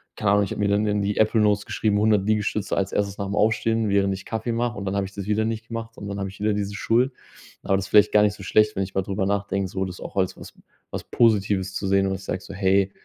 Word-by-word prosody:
keine 100 - +1
Ahnung. 105 0 +4
Ich 100 - -4
habe - - -4
mir 105 - +2
dann 100 +1 +2
in 105 -1 0
die 100 +1 -1
Apple 110 +1 +3
Notes 105 -1 +2
geschrieben: 105 -2 0
„100 105 -2 +3
Liegestütze 105 -1 0
als 100 -1 -1
1. 100 -1 -1
nach'm 100 0 -3
Aufstehen, 110 +1 +2
während 100 -1 +2
ich 95 - -8
Kaffee 110 +1 -3
mache“, 120 +1 -1
und 100 - -5
dann 95 0 -2
habe 100 -1 0
ich 95 - -10
das 100 -1 -6
wieder 105 +1 +1
nicht 110 0 -4
gemacht 115 0 -6
und 100 - -7
dann 100 0 -4
habe 100 - -2
ich 100 - -14
wieder 105 0 +2
diese 100 0 -3
Schuld. 120 +6 +1 0.5
Aber 95 - +2
das 100 0 -3
vielleicht 105 0 +5
gar 105 - +5
nicht 105 -1 +2
so 100 - -11
schlecht, 105 +3 +3
wenn 95 - 0
ich 95 - -7
mal 95 - +1
drüber 95 +1 -2
nachdenke, 100 -1 -1
so 95 0 -2
das 90 -1 -8
auch - - -8
als 95 -1 +1
was - - -12 0.4
was - - -5
Positives 100 -4 +2
zu 100 - -3
sehen 95 0 +3
und 95 - -1
ich 95 - -9
sage 95 - -3
so: - - -10
„Hey, 95 0 +2
100 Hz, 285 wpm, -24 LUFS, 95-110 Hz, 0.5 s, vielleicht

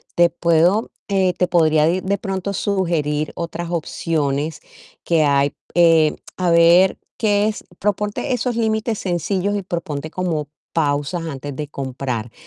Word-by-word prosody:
Te 175 0 +5
puedo, 170 +6 +2 0.2
eh, 190 -2 +2
te 180 - 0
podría 155 -3 +3
de 180 +2 +1
de 200 +1 0
pronto 195 0 -3
sugerir 165 -7 -1
otras 170 0 -4
opciones 155 -2 -1 0.5
que 165 -2 +3
hay, 140 -1 +2 0.2
eh, 165 -3 +4 0.2
a 180 -2 0
ver, 170 +3 +5 0.2
que 210 -1 +2
es 215 - -3 0.2
Proponte 210 +6 -1
esos 245 -1 -1
límites 220 -1 0
sencillos 190 +2 -1
y 200 - -1
proponte 160 -4 -4
como 160 -6 -2 0.2
pausas 150 +2 0
antes 145 -2 -6
de 150 0 -4
comprar. 130 -5 -4
170 Hz, 140 wpm, -20 LUFS, 150-195 Hz, 0.5 s, Te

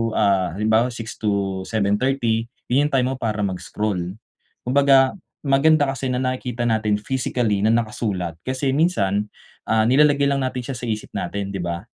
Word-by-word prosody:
ah, 95 -4 +2
halimbawa 110 +3 +3
6:00-7:30 110 +2 -1 0.2
yung 145 +4 +4
yung - - -9
time 125 -1 +3
mo - - -4
para 110 -3 -2
mag-scroll. 95 -1 -3 0.5
'Kumbaga 135 0 +5 0.3
maganda 145 +1 +4
kasi 135 0 -4
na 125 - 0
nakikita 125 -2 -2
natin 110 -2 +1
physically 120 -3 -1
na 110 - +4
nakasulat. 105 -7 -2
Kasi 130 +1 0
minsan, 105 - +1 0.4
ah, 110 0 +3
nilalagay 145 +2 +4
lang 140 0 +1
natin 130 -1 -2
siya 125 - -5
sa - - -5
isip 110 -1 -4
natin, 100 0 -3
'di 95 - -4
ba? 85 +1 -3
115 Hz, 150 wpm, -22 LUFS, 100-130 Hz, 0.5 s, Kumbaga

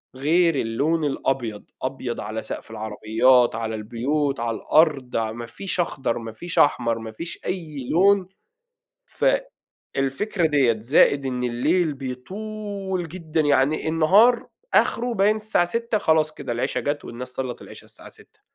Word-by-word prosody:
غير 165 +5 +2
اللون 140 +7 0
الأبيض، 125 -6 -2 0.2
أبيض - - -3
على - - -4
سقف - - -7
العربيات، 110 +3 +2
على 110 0 -3
البيوت، 135 +6 -1
على 115 -1 -2
الأرض 145 -2 +2
ع 110 -1 0
ما 120 +1 -6
فيش 185 +11 -4
أخضر، 140 -8 -1
ما 115 -1 -6
فيش 170 +10 -3
أحمر، 115 -5 +3
ما 110 0 -7
فيش 165 +10 -7
أي 155 -8 -4
لون، 195 +2 +4 1.5
فالفكرة 160 +7 -1
ديّة، 135 -7 +3
زائد 140 +3 +3
إن 125 -1 -2
الليل 150 +7 +1
بيطول 190 +7 -5
جدًا، 165 -2 -2
يعني 145 +1 +2
النهار 195 +10 +4 0.3
آخره 240 0 +2
باين 205 +1 +3
الساعة 215 -4 +1
18:00 230 +4 -1
خلاص 155 -3 +2
كده 120 - -5
العشا 125 +3 -1
جات 145 0 -2
والناس 125 +2 -7
صلّت 125 -1 -5
العشا - - -12
الساعة - - -12
18:00. - - -18
145 Hz, 140 wpm, -23 LUFS, 120-175 Hz, 1.5 s, لون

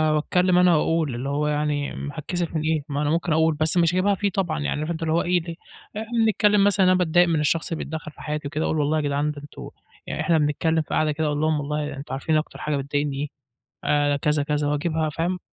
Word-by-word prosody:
واتكلم 180 +4 +2
أنا 180 -1 +5
وأقول، 155 -5 0
اللي 130 +3 -4
هو 150 +1 0
يعني، 150 -1 -1
امم، 145 - -5
هاتكسف 165 +2 -4
من 155 - 0
إيه، 155 -1 0
ما 145 +1 -2
أنا 150 - 0
ممكن 165 0 0
أقول، 160 0 +3
بس 155 +3 +1
مش 170 -1 +3
هاجيبها 195 +2 +2
فيه 200 +1 0
طبعًا، 175 -4 -1
يعني 145 0 -2
فهمت 155 - -3
أنت 165 -1 -4
اللي 160 0 0
هو 170 - +3
إيه 175 0 +1
ده. 165 0 -7 0.4
إحنا 220 - -3 0.2
بنتكلم 210 -2 +3
مثلًا، 200 -2 +4
أنا 185 - +5
باتضايق 175 0 +3
من 165 -2 +1
الشخص 160 +3 0
اللي 165 - -2
بيتدخل 155 -1 -6
في - - -15
حياتي 150 -1 -3
وكده، 155 +2 -2
وأقول 160 - 0
والله 150 +2 +1
يا - - +1
جدعان 145 +1 0
ده 145 - -9
أنتم 145 - -10 0.4
يعني - - -3
إحنا 170 - +2
بنتكلم 160 +2 +1
في - - -10
قعدة 155 -1 +2
كده 155 +1 -1
أقول 150 -1 -1
لهم 155 -1 +1
والله 150 0 -3
أنتم 135 -1 -7
عارفين 155 +4 0
أكتر 155 - -4
حاجة 150 -1 -1
بتضايقني 140 0 -2
إيه؟ 150 - -2 0.6
آآ، 145 0 +2
كذا 150 +1 +1
كذا، 150 0 -1
واجيبها 155 +1 0
فاهم، 175 +4 -2
155 Hz, 245 wpm, -24 LUFS, 145-170 Hz, 0.6 s, أنا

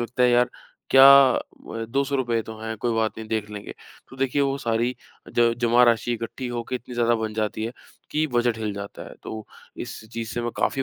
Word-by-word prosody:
लगता 120 +2 -1
है 125 - +5
यार 120 0 +3 0.4
क्या 135 0 +9 0.6
म 115 0 -5
₹200 130 -4 0
तो 110 0 -9
हैं, 110 0 -4
कोई 120 +2 -1
बात 110 0 0
नहीं 110 -1 -8
देख 110 -1 -2
लेंगे। 105 -1 -8 0.3
तो 135 - -13
देखिए 135 +1 +1
वो 135 0 0
सारी 120 0 0 0.4
ज 120 -1 +4
जमा 120 +1 +4
राशि 120 0 +2
इकट्ठी 115 +3 -5
होके 120 +1 -4
इतनी 125 0 -10
ज़्यादा 120 0 +2
बन 110 -1 -3
जाती 110 0 -2
है, 115 - -4 0.4
कि 155 +1 +1
बजट 120 -3 +1
हिल 110 -2 -2
जाता 100 0 -7
है - - -12
तो 110 -1 -7 0.3
इस - - -7
चीज़ 115 -1 -4
से 120 - -2
मैं 120 - -2
काफ़ी 135 - 0
120 Hz, 210 wpm, -24 LUFS, 110-125 Hz, 0.6 s, क्या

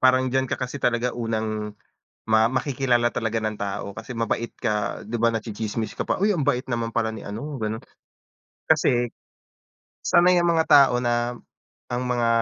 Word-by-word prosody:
parang 130 0 +4
diyan 130 0 +1
ka - - -1
kasi 130 +2 -5
talaga 120 +1 +1
unang 110 -2 -3 0.5
ma 110 0 +4
makikilala 130 -2 +1
talaga 115 0 -1
ng 110 -1 -2
tao, 100 0 -3
kasi 125 - -7
mabait 115 +1 -1
ka. 105 -4 -2
'Di 115 +3 -4
ba? 115 - +4
Natsitsismis 110 0 -3
ka - - -3
pa, - - +2
uy! 210 - +4
Ang 155 -8 -1
bait 125 +1 +2
naman 115 -1 -2
pala 110 -1 +1
ni 110 - -7
ano, 130 +7 -5
gano'n. 110 0 -3 0.8
Kasi 120 -1 +2 0.9
sanay 180 +1 +5
ang 170 - +3
mga 160 -1 +2
tao 135 -3 +6
na 120 0 0 0.5
ang 125 +1 -1
mga 120 -1 +1
120 Hz, 170 wpm, -24 LUFS, 110-130 Hz, 0.9 s, tao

